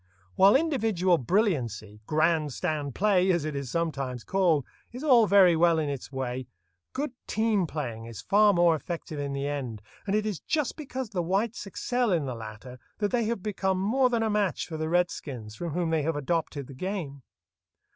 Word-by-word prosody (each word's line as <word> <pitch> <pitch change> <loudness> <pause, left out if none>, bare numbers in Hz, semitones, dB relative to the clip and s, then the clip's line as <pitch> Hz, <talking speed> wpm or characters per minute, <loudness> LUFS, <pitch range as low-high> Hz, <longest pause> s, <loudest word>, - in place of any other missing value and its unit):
While 195 +4 +6
individual 220 - +2
brilliancy—"grand 150 - 0
stand 150 -5 -2
play," 190 -2 +3
as 170 -4 0
it 155 -2 -3
is 140 -2 -4
sometimes 135 -6 -2
called—is 185 - -1
all 245 -7 +6
very 190 -4 +6
well 170 0 +4
in 155 -2 0
its 140 -1 -5
way, 130 -1 -4 0.4
good 280 +1 -3 0.2
team 215 -5 +1
playing 120 -8 -5
is 115 -3 -9
far 210 +1 +4
more 175 -3 +4
effective 160 -1 -6
in 140 -1 -3
the 140 0 -2
end, 135 -6 -3 0.3
and 200 - +1
it 215 0 +1
is 210 -6 -2
just 300 -5 -1
because 265 -6 -5
the 185 -4 -1
whites 200 +5 -1
excel 245 +3 -1
in 165 -5 +1
the 130 - -3
latter 115 +3 -9 0.2
that 205 -1 -1
they 235 -2 +1
have 220 -4 -2
become 190 -3 -1
more 250 +7 +2
than 235 -2 +1
a 220 - +1
match 205 -5 0
for 160 - -7
the 155 0 -2
redskins, 140 -10 -1
from 165 +7 -5
whom 170 -1 -1
they 160 -1 +2
have 160 +2 -1
adopted 145 -1 -2
the 135 - -11
game. 155 -3 -4
170 Hz, 185 wpm, -27 LUFS, 140-205 Hz, 0.4 s, While